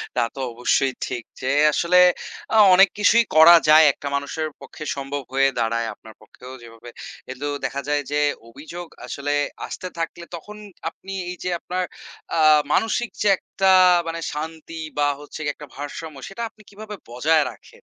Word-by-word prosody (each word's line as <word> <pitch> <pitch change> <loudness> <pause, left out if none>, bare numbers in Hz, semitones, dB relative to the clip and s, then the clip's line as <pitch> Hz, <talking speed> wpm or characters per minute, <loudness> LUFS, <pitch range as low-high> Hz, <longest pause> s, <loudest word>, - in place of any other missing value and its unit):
তা - - +1 0.2
তো - - -8
অবশ্যই 125 +3 +1
ঠিক। 120 -2 -5 0.2
যে 130 - -3 0.3
আসলে 170 +4 +2 0.6
আ - - +4 0.2
অনেক 195 +1 +7
কিছুই 225 +3 +5
করা 160 +2 +9
যায়, 155 +1 +8
একটা 140 - -8
মানুষের 145 +3 -3
পক্ষে 140 +3 -10
সম্ভব 140 0 -5
হয়ে 135 0 +4
দাঁড়ায়, 115 0 0
আপনার 110 - -15
পক্ষেও 130 +1 -13
যেভাবে। 115 0 -13 0.4
এগুলো 135 +3 -4 0.2
দেখা 140 +1 -3
যায় 145 0 +1
যে, 145 0 +1 0.3
অভিযোগ 160 +7 -9 0.2
আসলে 145 +1 -3 0.3
আসতে 185 - -6
থাকলে 170 +1 -5
তখন 210 +6 -10 0.3
আপনি 195 +3 -11 0.2
এই 180 - -5
যে 180 - -2
আপনার 185 +2 -3 0.5
আ - - +2 0.3
মানসিক 225 +1 0
যে 210 - +2
একটা 190 -1 0 0.4
মানে 165 0 -4
শান্তি 160 +2 -7 0.2
বা 145 0 +2
হচ্ছে 145 +1 -10
গিয়ে 145 -1 -1
একটা 150 - -11
ভারসাম্য, 145 +2 -7
সেটা 195 +4 -8
আপনি 220 - -22
কিভাবে 210 +1 -9
বজায় 150 +6 +2
রাখেন? - - -19
155 Hz, 165 wpm, -22 LUFS, 135-175 Hz, 0.6 s, করা